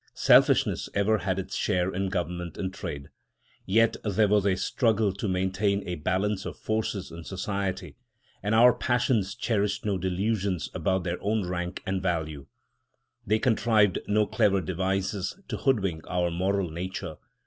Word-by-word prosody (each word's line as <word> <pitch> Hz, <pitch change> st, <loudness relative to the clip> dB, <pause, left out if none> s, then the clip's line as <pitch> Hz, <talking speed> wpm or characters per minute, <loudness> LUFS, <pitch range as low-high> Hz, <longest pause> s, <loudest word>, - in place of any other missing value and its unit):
Selfishness -, -, +4 dB
ever 105 Hz, +2 st, +2 dB
had 95 Hz, 0 st, -1 dB
its 95 Hz, -, -5 dB
share 90 Hz, -2 st, 0 dB
in 95 Hz, +1 st, -1 dB
government 90 Hz, -2 st, -3 dB
and 95 Hz, -1 st, -3 dB
trade. 70 Hz, -6 st, -6 dB, 0.6 s
Yet 115 Hz, +4 st, +3 dB
there 105 Hz, 0 st, +2 dB
was 100 Hz, -1 st, +3 dB
a 95 Hz, -, +3 dB
struggle 110 Hz, 0 st, +1 dB
to 100 Hz, +2 st, -4 dB
maintain 95 Hz, +2 st, 0 dB
a 90 Hz, -, -2 dB
balance 95 Hz, +5 st, -1 dB
of -, -, -6 dB
forces 110 Hz, -3 st, -2 dB
in 85 Hz, 0 st, -8 dB
society; 95 Hz, +1 st, -4 dB, 0.4 s
and 105 Hz, +3 st, 0 dB
our 120 Hz, +2 st, +7 dB
passions 120 Hz, -5 st, 0 dB
cherished 105 Hz, -4 st, -1 dB
no 100 Hz, -3 st, 0 dB
delusions 95 Hz, -2 st, -1 dB
about 95 Hz, -1 st, 0 dB
their 90 Hz, 0 st, -3 dB
own 105 Hz, -2 st, 0 dB
rank 90 Hz, 0 st, -4 dB
and 95 Hz, 0 st, -1 dB
value. 80 Hz, -6 st, -2 dB, 0.8 s
They 110 Hz, +2 st, +3 dB
contrived 110 Hz, -4 st, +3 dB
no 105 Hz, +1 st, +3 dB
clever 105 Hz, -3 st, +2 dB
devices 95 Hz, -, -2 dB
to -, -, -2 dB
hoodwink 95 Hz, -, 0 dB
our 90 Hz, -1 st, 0 dB
moral 95 Hz, 0 st, 0 dB
nature. 90 Hz, +3 st, -5 dB
95 Hz, 150 wpm, -27 LUFS, 90-105 Hz, 0.8 s, our